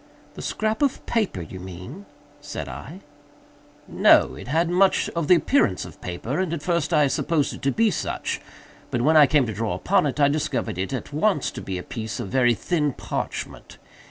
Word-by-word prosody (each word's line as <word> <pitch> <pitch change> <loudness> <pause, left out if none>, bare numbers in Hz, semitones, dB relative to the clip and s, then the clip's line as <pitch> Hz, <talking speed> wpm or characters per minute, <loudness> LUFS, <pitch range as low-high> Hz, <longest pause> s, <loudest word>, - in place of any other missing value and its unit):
"The - - -9
scrap 220 +3 -2
of 280 -3 0
paper, 205 - -1
you 95 +4 -9
mean," 95 - -9 0.3
said 80 - -6
I. 75 - -9 0.9
"No; - - +5
it - - -10
had 165 +5 +1
much 185 +3 +3
of 170 -3 -3
the 180 - +7
appearance 165 - +2
of - - -13
paper, 110 - -4
and 185 -3 -1
at 155 -3 -4
first 170 -2 0
I 150 -3 +4
supposed 150 +2 0
it - - -10
to 135 - +1
be 225 +4 +2
such, - - -3 0.5
but 120 - -1
when 155 +4 +4
I 150 -2 +8
came 145 -3 +3
to 110 - -4
draw 105 -3 -2
upon 185 - +2
it, 140 - -3
I 140 - +6
discovered 140 - -1
it, 95 - -2
at 135 +2 -5
once, 160 0 +1
to - - -7
be 95 -1 -4
a 90 - -6
piece 110 +1 -5
of 95 - -4
very 120 +1 +3
thin 150 - 0
parchment. - - -5
145 Hz, 200 wpm, -24 LUFS, 110-175 Hz, 0.9 s, I